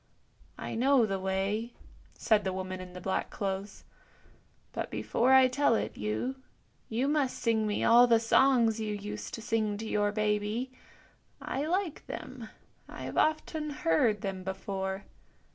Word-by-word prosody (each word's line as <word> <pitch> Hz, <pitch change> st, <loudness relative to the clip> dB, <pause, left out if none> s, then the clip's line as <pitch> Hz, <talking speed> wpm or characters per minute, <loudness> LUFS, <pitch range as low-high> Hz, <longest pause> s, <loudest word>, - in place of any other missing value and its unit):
" -, -, -32 dB
I -, -, -5 dB
know 255 Hz, +1 st, +4 dB
the 195 Hz, -2 st, -2 dB
way," 195 Hz, +5 st, -1 dB, 0.4 s
said 215 Hz, -3 st, +3 dB
the 190 Hz, -, -1 dB
woman 185 Hz, 0 st, -4 dB
in 180 Hz, -1 st, -10 dB
the 180 Hz, -, -7 dB
black 190 Hz, +1 st, -1 dB
clothes; 195 Hz, 0 st, -4 dB, 0.5 s
" -, -, -34 dB
but -, -, -3 dB
before 250 Hz, +3 st, +1 dB
I 265 Hz, -1 st, +8 dB
tell 255 Hz, -2 st, +2 dB
it -, -, -2 dB
you, 110 Hz, -, -2 dB, 0.5 s
you 240 Hz, +5 st, 0 dB
must 290 Hz, -3 st, +1 dB
sing 220 Hz, -2 st, +1 dB
me 205 Hz, -, -1 dB
all 240 Hz, +2 st, +7 dB
the 230 Hz, -1 st, +5 dB
songs 230 Hz, -1 st, +4 dB
you 215 Hz, -1 st, -2 dB
used 210 Hz, +1 st, -6 dB
to 225 Hz, -, -9 dB
sing 215 Hz, -2 st, 0 dB
to 220 Hz, -, -6 dB
your 205 Hz, -1 st, +1 dB
baby; 210 Hz, +4 st, -1 dB, 0.7 s
I 285 Hz, +3 st, -3 dB
like 360 Hz, -2 st, -2 dB
them; 250 Hz, -4 st, -7 dB, 0.4 s
I -, -, -8 dB
have -, -, -6 dB
often 310 Hz, 0 st, 0 dB
heard 280 Hz, -, +1 dB
them 190 Hz, -2 st, -4 dB
before. 190 Hz, 0 st, -4 dB
220 Hz, 160 wpm, -30 LUFS, 195-255 Hz, 0.7 s, I